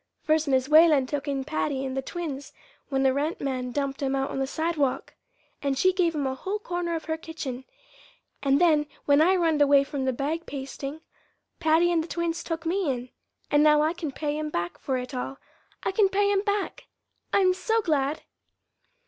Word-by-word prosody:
First 315 -1 +2
Mis' 260 -1 +2
Whalen 305 -3 +6
took 285 +2 -4
in 275 -1 -1
Patty 280 -2 -2
and 260 0 -4
the 270 - 0
twins 285 -2 -6 0.4
when 270 -2 +1
the 265 -1 +4
rent 295 +4 -1
man 255 -2 -3
dumped 275 +1 -2
'em 275 -1 0
out 270 0 -1
on - - -3
the 270 - 0
sidewalk, 315 -3 -1 0.5
and 275 -1 0
she 370 +6 +4
gave 345 -3 +1
'em 290 -2 -1
a 265 - 0
whole 380 +10 -3
corner 350 -4 -3
of 320 - -5
her 320 -1 -2
kitchen. 275 -6 -6 0.8
And 275 0 +3
then 310 -4 +4 0.2
when 285 +1 +5
I 365 +4 +5
runned 325 -4 +2
away 280 -1 +6
from 275 -1 -4
the 260 - +2
bag 295 +6 -3
pasting, 275 +2 -6 0.6
Patty 325 +2 +3
and 330 -2 +2
the - - -8
twins 340 0 -2
took 330 0 -4
me 355 -1 0
in. 250 0 -5 0.4
And 290 - +5
now 300 0 +5
I 315 +2 +1
can 330 -4 -5
pay 295 +2 -3
'em 305 0 -3
back 175 -9 -3
for 265 -2 -1
it 250 +2 -6
all 260 +2 -4 0.5
I - - 0
can 390 0 +3
pay 405 +1 +2
'em 395 -1 +2
back. 405 -1 -2 0.4
I'm 375 -2 +4
so 445 +4 0
glad!" 295 -3 0
300 Hz, 200 wpm, -26 LUFS, 270-335 Hz, 0.8 s, Whalen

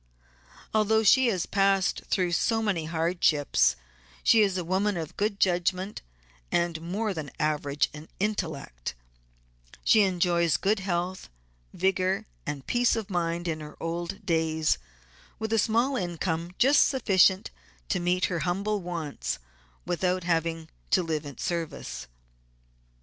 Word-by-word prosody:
Although 220 +1 +3
she 260 +4 +6
has 190 -7 0
passed 195 -1 +2
through 180 -3 0
so 225 +6 +1
many 185 -7 0
hardships 160 - +2 0.5
she 225 - +6
is 195 -3 +2
a 180 - -2
woman 190 +3 0
of 160 -2 -5
good 205 -1 -1
judgment 185 +2 0 0.5
and 170 -2 0
more 200 +5 -2
than 155 -5 -5
average 145 -2 +1 0.3
intellect; 160 - -3 1.0
enjoys 175 -6 +3
good 205 +2 +1
health, 185 0 -3 0.4
vigor, 190 +1 0 0.2
and 140 -2 -4
peace 245 -1 +2
of 215 -3 -4
mind 175 -1 -1
in 160 -2 -2
her 150 -1 -10
old 175 +5 -4
days, 160 - +1 0.6
with 220 0 -3
a 225 - +4
small 235 +6 +2
income 175 -3 -2
just 275 +4 +5
sufficient 195 -7 +3 0.4
to - - +1
meet 180 +1 +1
her 175 -3 -1
humble 200 +4 -1
wants 155 - -4 0.5
without 180 +1 0
having 165 -1 -1 0.2
to 185 - +3
live 155 -3 -2
at 140 - -10
service. 170 - -4
180 Hz, 130 wpm, -27 LUFS, 165-200 Hz, 1.0 s, she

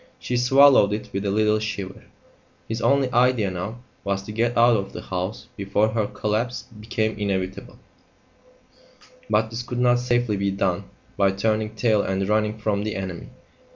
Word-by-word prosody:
She 125 - -3
swallowed 125 -3 +6
it 105 0 -4
with 100 +1 -2
a - - +1
little 105 +1 +2
shiver. 100 -1 -5 0.6
His 115 +1 -3
only 135 -2 +2
idea 120 -5 +3
now 100 +7 -6 0.2
was 100 -1 -2
to 105 - -8
get 115 +2 0
out 120 0 +6
of 100 -2 -3
the - - -6
house 95 +4 -4
before 100 +2 +1
her 110 -1 0
collapse 110 +5 -2 0.2
became 110 0 -2
inevitable; 95 -2 -3 1.5
but 110 +1 +1
this 115 +1 -4
could 125 0 -6
not 125 0 +3
safely 120 -3 0
be 100 0 0
done 95 -2 -1 0.3
by 100 - +4
turning 110 +2 -1
tail 110 -2 +2
and 95 0 -1
running 105 0 +1
from 105 -2 -1
the 105 0 -3
enemy. 95 -3 -5
110 Hz, 165 wpm, -23 LUFS, 100-115 Hz, 1.5 s, swallowed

